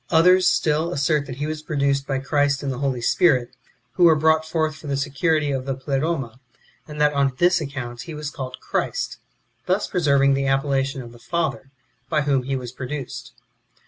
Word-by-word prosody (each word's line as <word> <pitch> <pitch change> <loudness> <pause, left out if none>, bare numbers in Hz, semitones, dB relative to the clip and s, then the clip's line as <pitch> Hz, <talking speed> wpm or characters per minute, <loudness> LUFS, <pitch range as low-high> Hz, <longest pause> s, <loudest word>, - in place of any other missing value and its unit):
Others 180 +2 +5
still, 155 +2 +1
assert 145 -1 +1
that 130 - -6
he 145 +3 -3
was 155 0 -4
pro 155 -1 -5
duced 140 0 +1
by 135 - 0
Christ 140 +1 +1
and 140 - -1
the 125 - -6
Holy 135 -3 -1
Spirit, 130 -3 +3 0.4
who 175 - +3
were 165 -2 +7
brought 160 +1 +3
forth 155 -1 0
for 155 - -11
the 140 -1 -1
security 145 +2 0
of 135 -1 -3
the 135 - -1
Pleroma; 135 -2 -2 0.5
and 150 -1 -8
that 150 0 +3
on 140 -2 +1
this 175 +2 +3
account 130 -5 -5
he 165 - -8
was 150 -1 -5
called 130 -4 -7
Christ, - - -2 0.5
thus 185 +3 +1
preserving 140 -6 +3
the 135 0 0
appellation 135 -1 0
of 120 - -11
the 120 - -15
Father, 140 -2 -2 0.4
by 155 -2 +2
wdiom 135 -3 0
he 135 - 0
was 125 -2 -5
produced. 130 -1 -6
140 Hz, 195 wpm, -23 LUFS, 135-155 Hz, 0.5 s, were